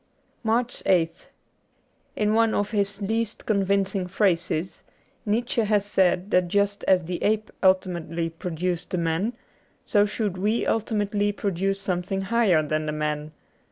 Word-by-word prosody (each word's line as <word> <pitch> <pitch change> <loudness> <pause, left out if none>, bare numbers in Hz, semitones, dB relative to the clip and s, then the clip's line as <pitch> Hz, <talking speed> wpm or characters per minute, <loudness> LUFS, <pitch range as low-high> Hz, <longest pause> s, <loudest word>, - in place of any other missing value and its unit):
^ - - -41 0.4
73 225 - -3 0.5
MARCH 165 -2 +1
8th 165 - -23 0.9
IN 210 0 +1
one 225 0 +3
of 205 0 -1
his 200 -1 -1
least 225 +2 -2
convincing 195 -2 +1
phrases, 180 -3 0 0.5
Nietzsche 230 +2 +1
had 210 -1 +2
said 190 -1 +1
that 180 -1 +3
just 200 +2 0
as 185 -2 +4
the 175 +1 -4
ape 215 0 0
ultimately 175 -3 +1
pro 165 +2 -6
duced 175 +1 -2
the 185 - -2
man, 170 +7 0 0.5
so 205 -1 +3
should 205 -3 -2
we 215 +4 +1
ultimately 205 -2 0
produce 195 -1 -1
something 190 0 -2
higher 195 -5 +3
than 155 +1 -2
the - - 0
man. 150 0 -3
195 Hz, 150 wpm, -25 LUFS, 175-210 Hz, 0.9 s, as